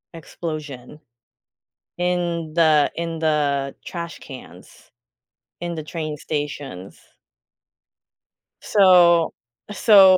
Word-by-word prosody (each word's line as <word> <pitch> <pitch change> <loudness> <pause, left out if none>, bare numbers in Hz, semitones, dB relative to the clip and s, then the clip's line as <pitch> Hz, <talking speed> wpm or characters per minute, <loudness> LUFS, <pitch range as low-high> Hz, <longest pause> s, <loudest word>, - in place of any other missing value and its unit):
explosion 150 -4 -7 1.0
in 175 -3 -1
the 155 -3 +4
in 165 -1 -4
the 145 -3 0
trash 170 -1 -6
cans 130 -3 -13 0.7
in 170 -1 -3
the 155 - -5
train 155 -2 -5
stations. 145 - -5 1.6
So, 175 -4 +5 0.4
so 195 -2 +7
160 Hz, 75 wpm, -22 LUFS, 150-175 Hz, 1.6 s, so